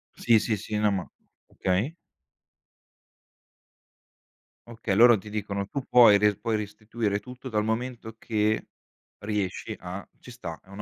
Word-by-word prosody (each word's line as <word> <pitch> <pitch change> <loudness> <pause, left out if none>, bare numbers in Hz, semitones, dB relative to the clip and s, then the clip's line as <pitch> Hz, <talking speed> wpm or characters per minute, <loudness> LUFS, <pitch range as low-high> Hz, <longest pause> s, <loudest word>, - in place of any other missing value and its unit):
Sì, 115 -2 +4
sì, 110 +1 -1
sì, 105 +1 -4
no, 105 0 +3
ma 95 -3 -3 0.4
okay. 100 - -1 2.7
Okay, 115 -4 -3
loro 120 +2 +7
ti 105 +2 -10
dicono: 100 -2 -3
"Tu 140 - -3
puoi 115 -5 +7
re 105 0 +3
puoi 115 -1 -1
restituire 105 0 -2
tutto, 125 +3 -9
dal 105 -2 0
momento 115 0 -3
che, 110 -1 0 0.5
riesci, 105 +1 -3
a" 90 +2 -7
ci - - -14
sta, 115 -10 -7
è - - -29
un 100 +1 -8
105 Hz, 140 wpm, -27 LUFS, 100-115 Hz, 2.7 s, loro